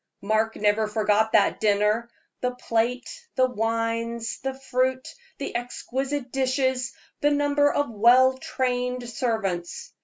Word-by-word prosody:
Mark 220 +2 +1
never 210 +1 +2
forgot 215 0 +1
that 215 - +3
dinner 210 +2 +2 0.3
the 250 0 -1
plate, 240 +1 -1 0.3
the 260 - +4
wines, 230 0 -2
the 270 0 -3
fruit, 260 -1 -1 0.3
the 280 - -5
exquisite 260 +2 -3
dishes, 260 -1 0 0.3
the 290 - +3
number 290 0 +2
of 290 0 0
well 245 +4 +5
trained 250 -1 -2
servants. 220 -8 -3
245 Hz, 120 wpm, -25 LUFS, 220-260 Hz, 0.3 s, well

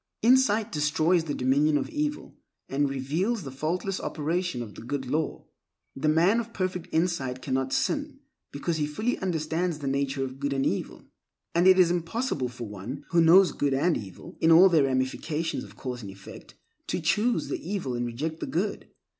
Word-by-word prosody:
Insight 230 -3 +4
destroys 155 +3 +2
the 145 - -3
dominion 145 +4 +2
of - - -2
evil 300 0 -3 0.3
and 140 +1 0
reveals 160 - -1
the 135 - -7
faultless 170 +7 -2
operation 160 -3 -2
of 105 -3 -10
the - - -10
Good 130 +3 -4
Law. 150 +4 -2 0.5
The 135 - -1
man 175 +9 +4
of 230 0 -6
perfect 185 -2 -2
insight 160 -7 0
cannot 130 -1 -1
sin, - - -1 0.3
because 160 +3 -2
he 150 -1 0
fully 215 +12 -2
understands 165 -1 -1
the 145 - -7
nature 135 0 -1
of 130 0 -6
good 140 0 -1
and 135 0 0
evil. - - -2 0.5
And 175 +2 +4
it 190 0 +7
is 180 -2 +5
impossible 175 - -1
for 120 -1 -7
one 105 +8 -7
who 170 -1 +4
knows 180 +3 +7
good 140 -2 0
and 165 +5 +2
evil, 95 -4 -9
in 165 - +5
all 180 +4 +8
their 160 -5 +4
ramifications 135 +5 -1
of - - -13
cause 125 -2 -5
and 100 - -8
effect, 95 0 -12 0.3
to - - -1
choose 210 +9 +1
the - - -2
evil 180 -8 -3
and 120 0 -2
reject 155 +7 -4
the - - -4
good. 200 +5 -2
155 Hz, 185 wpm, -27 LUFS, 135-180 Hz, 0.5 s, all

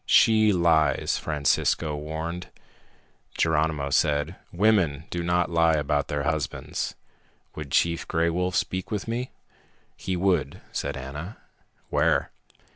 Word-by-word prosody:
"She 110 -1 +5
lies," 85 -4 +2
Francisco 75 0 +1
warned. 80 +4 -5 0.9
Geronimo 75 -3 +1
said, 75 +3 +1 0.2
"Women 90 -7 +2
do 85 - -2
not 85 0 +1
lie 85 -1 +4
about 75 -1 0
their 75 -1 -2
husbands. 80 -1 -2 0.6
Would 75 -2 -7
Chief 85 +4 +1
Gray 85 +1 +1
Wolf 90 +1 -1
speak 95 +2 -1
with 105 -1 -3
me?" 120 +3 -2 0.7
"He 95 - -3
would," 95 0 +1
said - - -3
Ana. 75 - -7 0.5
"Where?" - - +2
80 Hz, 120 wpm, -26 LUFS, 75-90 Hz, 0.9 s, She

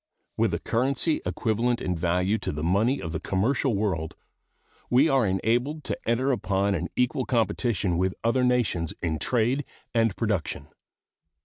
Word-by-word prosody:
With - - +1
a - - -3
currency 135 +6 0
equivalent 115 +6 0
in 90 - -2
value 90 +5 +1
to - - -2
the 75 +1 -5
money 105 +11 +2
of 80 - -5
the 80 - -3
commercial 115 +8 0
world, 95 -6 -1 0.7
we 130 +6 +5
are 135 -7 +3
enabled 120 +11 0
to - - -3
enter 130 +4 +2
upon 100 -4 0
an 85 -2 -2
equal 125 +1 +1
competition 110 -6 0
with 95 +1 0
other 115 +3 +2
nations 120 -10 +1
in 80 -2 -1
trade 125 - +1 0.3
and 115 -4 +2
production. 105 -8 -2
110 Hz, 150 wpm, -26 LUFS, 90-125 Hz, 0.7 s, we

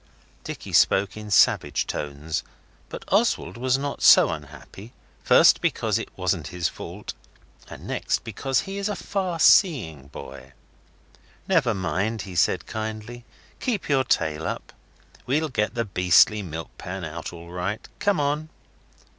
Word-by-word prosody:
Dicky - - -7
spoke 95 0 +3
in 105 -1 -8
savage 100 - +3
tones. 75 +2 -4 0.5
But - - -8
Oswald 85 - +1
was 130 +2 +1
not 140 +1 -4
so - - +7
unhappy, 75 - -10 0.3
first - - +6
because - - 0
it - - -6
wasn't - - -1
his 90 -2 -2
fault, - - -8 0.6
and - - -10
next - - -2
because 135 -1 -1
he 195 +1 -6
is 200 +1 -2
a 205 - -2
far 185 -5 -3
seeing 120 - +4
boy. 65 -1 -11 0.9
'Never 150 - +2
mind,' 100 +4 -2
he 95 - -9
said 85 - +1
kindly. 110 +2 -6 0.3
'Keep 230 - -2
your 135 -2 +3
tail 80 -8 0
up. - - -6 0.5
We'll 150 +5 +1
get 105 -2 -1
the 115 -1 -1
beastly 95 +2 +4
milk 80 -4 -7
pan 90 0 -5
out 80 +1 -6
all 85 0 -11
right. 90 +4 -4
Come 205 -5 +1
on. 150 +2 -1
105 Hz, 145 wpm, -24 LUFS, 85-140 Hz, 0.9 s, so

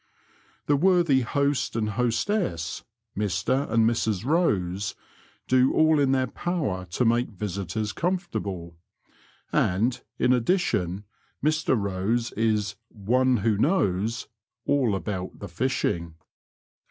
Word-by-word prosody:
The 145 - +3
worthy 170 -3 +4
host 140 +2 0
and 110 -2 0
hostess, 115 - -1 0.3
Mr 105 +7 0
and 115 0 +4
Mrs 110 -3 0
Bose, 100 - 0 0.5
do 130 +1 +4
all 155 -1 +4
in 140 -2 +3
their 130 -1 +2
power 135 - -2
to 90 +8 -1
make 120 +2 +2
visitors 105 0 -4
comfortable, 100 - -3 0.7
and, 110 +8 +1 0.2
in 125 - +3
addition, 115 - 0 0.4
Mr 155 -5 +2
Bose 100 +4 -1
is 105 -2 0
'' 115 - -54 0.2
one 130 0 +4
who 105 -3 +2
knows 115 - +1 0.2
'' - - -61
all 130 -8 +2
about 95 -2 -4
the 100 - -7
fishing. 85 -5 -1
115 Hz, 115 wpm, -26 LUFS, 100-135 Hz, 0.7 s, worthy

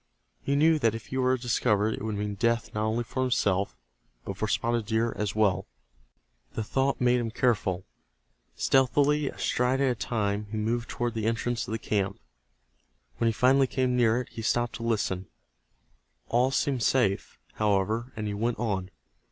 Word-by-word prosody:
He 140 - 0
knew 155 +2 +4
that 115 -5 +2
if 115 - -7
he 130 - -5
were 130 0 +2
discovered 110 -3 +1
it - - -6
would 110 0 -2
mean 105 0 -2
death 115 +2 0
not 110 +1 0
only 115 +2 0
for 130 +2 -4
himself, 100 -6 +1 0.5
but 100 - -4
for 110 +3 -2
Spotted 115 0 0
Deer 115 +1 +1
as 105 -1 -2
well. 100 -3 +2 0.9
The 110 - -1
thought 135 +5 0
made 125 0 +3
him 115 -1 -2
careful. 105 -6 0 0.7
Stealthily, 140 +2 +3
a - - -11
stride 125 +2 +1
at 135 -2 +3
a - - +1
time, 105 -3 -2
he 110 - -4
moved 115 +3 -1
toward 120 -1 -2
the 110 -1 -2
entrance 115 +1 -1
of - - -6
the 110 - 0
camp. 100 -3 -1 1.0
When 115 - +2
he - - +4
finally 130 +4 +4
came 130 -1 0
near 120 -1 +3
it, 125 - -6
he 115 - -7
stopped 120 +1 0
to - - -10
listen. 100 -5 -1 1.0
All 125 +2 +3
seemed 135 -2 0
safe, 110 -5 +1 0.2
however, 110 +4 0
and 110 - -4
he 105 - -2
went 115 +3 -1
on. 95 -5 -2
115 Hz, 180 wpm, -28 LUFS, 105-125 Hz, 1.0 s, knew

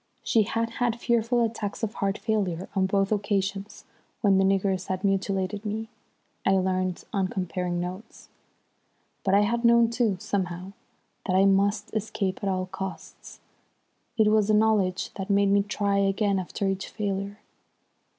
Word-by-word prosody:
She 225 - +3
had 230 +2 -1
had 235 -1 +1
fearful 235 0 +2
attacks 220 -2 -3
of 220 -1 -1
heart 195 0 -1
failure 190 -5 -1
on 190 -1 +2
both 195 +1 +1
occasions 200 0 -2 0.4
when 195 -2 +4
the - - +4
niggers 190 -1 +1
had 185 0 -3
mutilated 195 0 0
me, 220 +1 -4 0.5
I 195 - +3
learnt 185 -1 0
on 195 -2 +1
comparing 180 -2 -2
notes. 185 +5 -7 1.0
"But 195 0 +3
I 200 - +6
had 235 +3 0
known 235 -1 +5
too, 230 -5 +1
somehow, 185 -1 -3 0.6
that 185 - +1
I 190 +1 +5
must 200 +2 +2
escape 205 -3 -2
at 200 - -1
all 185 -1 -1
costs. 190 +1 -8 0.8
It 215 -1 +5
was 215 -1 +3
the 215 - +4
knowledge 210 -4 +2
that 195 +1 -5
made 200 0 +3
me 200 0 +5
try 200 0 -1
again 200 0 +1
after 195 +2 -3
each 195 0 -2
failure. 200 -1 -3
200 Hz, 155 wpm, -26 LUFS, 190-215 Hz, 1.0 s, I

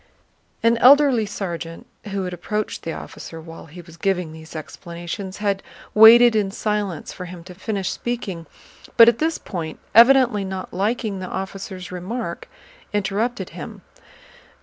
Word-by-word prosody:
An 230 0 +4
elderly 260 -3 +6
sergeant 170 -4 -6 0.2
who 200 -2 -3
had 180 -1 -4
approached 210 +4 -3
the 165 - -4
officer 165 0 -8
while 165 0 -11
he 175 +3 -11
was 170 -1 -15
giving 180 -3 -1
these 160 0 -12
explanations 175 +4 -7
had 200 -2 -1 0.3
waited 230 +2 +8
in 205 -2 +1
silence 205 -4 -3
for 180 - -7
him 175 -1 -10
to 180 +1 -11
finish 195 +1 -3
speaking, 195 -9 -4 0.5
but 230 -1 +10
at 235 -1 +4
this 320 +1 0
point, 165 -5 -6 0.2
evidently 240 -2 +6
not 190 -1 -6
liking 210 +1 -1
the 185 - -5
officer's 190 -1 -6
remark, 180 +1 -5 0.4
interrupted 210 +4 -1
him. - - -9
195 Hz, 145 wpm, -22 LUFS, 175-225 Hz, 0.5 s, but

